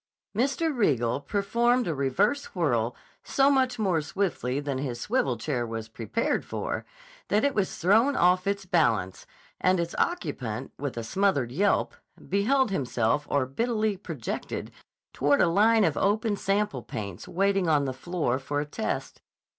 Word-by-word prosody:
Mr. 275 +6 +1
Riegel 125 - +1
performed 235 - +1
a 165 - 0
reverse 140 - 0
whirl 120 -9 +1 0.3
so 275 +1 +3
much 260 -2 +2
more 190 -7 +1
swiftly 150 -7 -2
than 140 -2 -3
his 125 -4 -3
swivel 245 - 0
chair 130 -6 -2
was 115 -1 -5
prepared 115 - -1
for - - -4 0.4
that 210 - +2
it 280 - +2
was 200 -5 -1
thrown 225 - +4
off 180 +2 +3
its 200 -1 -1
balance, 115 - +1 0.3
and 185 0 +3
its 170 0 -2
occupant, 125 - -2
with 140 -3 -4
a 115 - -3
smothered 140 - +1
yelp, 195 +9 +1 0.4
beheld 220 +5 +2
himself 130 -3 0
orbitally 215 - 0
projected 165 - -5 0.4
toward 145 +1 +2
a - - +5
line 215 +6 +4
of 160 -6 +2
open 210 +1 +1
sample 195 -9 0
paints 100 -6 -7
waiting 195 -1 +1
on 145 -2 +3
the 130 - -2
floor 135 -2 -1
for 145 +2 -2
a 145 - -1
test. 150 - -4
175 Hz, 150 wpm, -27 LUFS, 130-210 Hz, 0.4 s, a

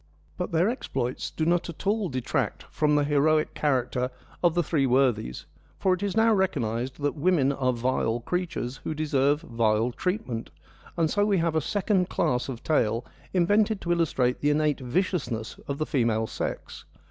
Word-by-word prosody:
But - - -4
their 170 +3 +3
exploits 130 - -2
do 155 - -2
not 175 +1 +1
at 170 - -9
all 205 -1 +1
detract 130 -2 -2
from 150 -1 +2
the 145 - +3
heroic 150 +2 +2
character 125 -3 0 0.3
of 175 -2 +3
the 175 - +2
three 145 -3 +1
worthies, 125 - +1 0.3
for 190 - +2
it 185 - -3
is 205 +1 -2
now 225 0 +5
recognised 130 - -1
that 145 - +1
women 150 -3 +2
are 130 -2 +1
vile 120 -1 0
creatures 165 -4 -3
who 155 - -5
deserve 145 -1 +1
vile 115 -3 +1
treatment, 130 - -3 0.5
and 165 -1 +3
so 205 +6 +1
we 205 -2 +2
have 165 -1 +1
a 160 - +3
second 190 +1 0
class 130 -6 0
of 120 -3 -6
tale 115 -6 +1 0.3
invented 205 +4 +2
to 175 - -2
illustrate 140 -7 +1
the 145 - +2
innate 150 0 +2
vicious 160 +3 -1
ness 110 -2 -5
of 140 - -3
the 155 - -1
female 115 -7 +1
sex. - - -5
150 Hz, 175 wpm, -26 LUFS, 125-175 Hz, 0.5 s, now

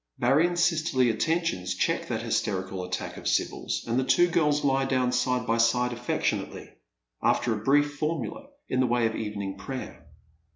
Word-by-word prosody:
Marion's 165 +8 +3
sisterly 155 -8 +2
attentions 110 - -1
check - - 0
that - - -3
hysteiical 95 -1 -2
attack 90 0 -4
of - - -6
Sibyl's, - - -1
and 120 +2 0
the - - +1
two 175 +6 +4
girls 150 -3 +2
lie 135 -1 +2
down 130 -2 +1
side 125 -1 0
by 115 0 +1
side 125 +2 +3
alfectiouately, 120 0 -2 0.5
after 120 -1 +2
a 105 -1 -5
brief 145 +3 +2
formula 165 - -3 0.2
in 130 - -1
the 130 - +3
way 120 -1 +2
of 110 - 0
evening 100 -2 -4
prayer. 130 +4 -7
125 Hz, 165 wpm, -27 LUFS, 115-145 Hz, 0.5 s, two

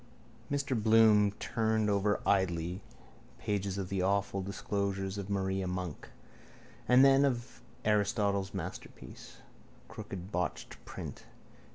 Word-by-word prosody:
Mr 140 -2 0
Bloom 110 -2 +5
turned 110 0 0
over 105 0 +1
idly 90 -1 +1 0.6
pages 100 -3 -2
of 95 -2 -3
The 95 -1 -1
Awful 100 +1 0
Disclosures 100 0 -2
of 100 0 -6
Maria 95 -1 -1
Monk, 90 -3 -5 0.8
then 135 +2 +6
of 120 -4 -2 0.2
Aristotle's 100 -2 +1
Masterpiece. 95 -1 -8 0.5
Crooked 95 +1 -8
botched 90 -2 -3
print. - - -8
100 Hz, 100 wpm, -32 LUFS, 95-110 Hz, 0.8 s, then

